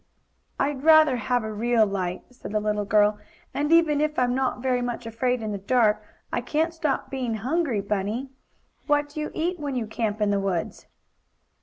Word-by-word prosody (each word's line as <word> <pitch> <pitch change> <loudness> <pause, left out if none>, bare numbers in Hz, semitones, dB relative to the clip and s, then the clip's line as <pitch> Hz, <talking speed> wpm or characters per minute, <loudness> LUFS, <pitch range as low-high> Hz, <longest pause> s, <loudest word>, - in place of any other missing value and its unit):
"I 275 - +2
I'd 270 -2 -7
rather 315 -4 +6
have 245 +1 0
a 220 0 -4
real 230 +1 +3
light," 185 -3 -3
said 245 -4 -9
the 215 - +2
little 210 -1 -1
girl. 210 +1 +3 0.3
"And 295 +2 -1
even 320 -3 +4
if 305 0 0
I'm 245 -1 +2
not 260 -1 0
very 250 -1 +1
much 245 -1 -4
afraid 235 +1 -1
in 215 - -3
the 200 - -4
dark, 215 0 +2 0.3
I - - 0
can't 310 +7 0
stop 305 -4 -2
being 250 -4 -2
hungry, 255 0 0
Bunny. 210 +6 -2 0.6
What 290 -1 +2
do 295 - -7
you 300 - -2
eat 350 +2 -1
when 285 -3 -3
you 240 -3 -1
camp 220 -1 -2
in 210 -1 +2
the 200 - +1
woods?" 190 -4 -3
245 Hz, 195 wpm, -25 LUFS, 210-290 Hz, 0.6 s, rather